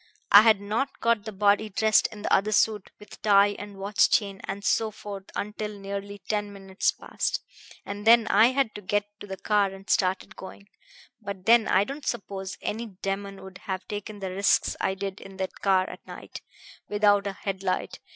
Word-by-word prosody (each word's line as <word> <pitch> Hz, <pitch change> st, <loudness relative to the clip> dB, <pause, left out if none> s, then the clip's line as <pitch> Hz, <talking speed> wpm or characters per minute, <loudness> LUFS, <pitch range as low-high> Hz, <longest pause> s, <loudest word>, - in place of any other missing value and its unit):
I 205 Hz, -, +11 dB
had 220 Hz, -2 st, +5 dB
not 220 Hz, +7 st, -2 dB
got 230 Hz, -3 st, +1 dB
the 220 Hz, -, -5 dB
body 205 Hz, +1 st, +2 dB
dressed 215 Hz, +2 st, +3 dB
in 210 Hz, -2 st, -11 dB
the -, -, 0 dB
other 210 Hz, +2 st, +3 dB
suit, 210 Hz, -1 st, +2 dB
with 210 Hz, -, -14 dB
tie 205 Hz, -1 st, +4 dB
and 205 Hz, -1 st, -9 dB
watch 200 Hz, +1 st, +2 dB
chain 200 Hz, -3 st, 0 dB
and 200 Hz, +1 st, -5 dB
so 225 Hz, +1 st, +2 dB
forth, 200 Hz, -2 st, -8 dB
until 210 Hz, 0 st, -4 dB
nearly 200 Hz, 0 st, -6 dB
ten 210 Hz, -1 st, -1 dB
minutes 195 Hz, -1 st, -1 dB
past; -, -, -3 dB, 0.5 s
and 205 Hz, +1 st, -6 dB
then 230 Hz, 0 st, +7 dB
I 215 Hz, +3 st, +5 dB
had 260 Hz, -3 st, 0 dB
to 210 Hz, -, -8 dB
get 205 Hz, +2 st, 0 dB
to 205 Hz, -, -9 dB
the 190 Hz, -1 st, -6 dB
car 205 Hz, -1 st, +2 dB
and 195 Hz, +1 st, -12 dB
start 185 Hz, -1 st, +1 dB
it 215 Hz, -, -17 dB
going.... 200 Hz, +1 st, -11 dB, 0.5 s
But 200 Hz, -3 st, -7 dB
then 230 Hz, 0 st, +5 dB
I 190 Hz, -, +4 dB
don't 275 Hz, +6 st, -7 dB
suppose 195 Hz, -4 st, -4 dB
any 230 Hz, +2 st, -3 dB
demon 195 Hz, 0 st, -5 dB
would 190 Hz, 0 st, -11 dB
have 185 Hz, -1 st, -3 dB
taken 210 Hz, 0 st, -6 dB
the 190 Hz, -1 st, -3 dB
risks 200 Hz, +2 st, +2 dB
I 190 Hz, -, 0 dB
did 195 Hz, 0 st, -5 dB
in 195 Hz, -1 st, -12 dB
that 190 Hz, -1 st, -5 dB
car 190 Hz, -2 st, +3 dB
at -, -, -11 dB
night, -, -, -9 dB, 0.5 s
without 205 Hz, -1 st, +3 dB
a 200 Hz, -, -3 dB
head 195 Hz, -1 st, -5 dB
light. 185 Hz, -1 st, -2 dB
200 Hz, 200 wpm, -26 LUFS, 195-210 Hz, 0.5 s, I